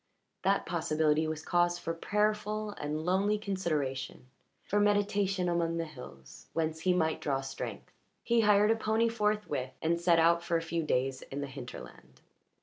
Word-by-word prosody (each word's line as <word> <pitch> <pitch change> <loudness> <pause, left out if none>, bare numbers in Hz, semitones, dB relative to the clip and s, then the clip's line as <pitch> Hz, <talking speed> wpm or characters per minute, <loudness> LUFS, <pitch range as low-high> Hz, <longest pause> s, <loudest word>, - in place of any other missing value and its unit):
That - - +2
possibility 155 0 +1
was 155 0 -4
cause 175 0 +2
for 165 -1 -3
prayerful 210 +3 -1
and 155 -4 -4
lonely 195 +4 +2
consideration, 155 -12 -3 0.4
for 205 - 0
meditation 205 -2 +2
among 170 -1 0
the 165 - -1
hills, 65 - -12
whence 160 -1 -1
he 180 +2 +2
might 160 -3 0
draw 135 -2 0
strength. 135 0 -6 0.3
He 235 -1 +3
hired 210 0 +5
a - - +4
pony 225 +1 +1
forthwith 210 - -1
and 170 +1 0
set 170 -1 +4
out 170 +1 +4
for 170 -1 +1
a - - -2
few 165 0 -2
days 135 -3 0
in 140 +1 -6
the - - -2
hinterland. 120 - -10
170 Hz, 160 wpm, -31 LUFS, 150-205 Hz, 0.4 s, hired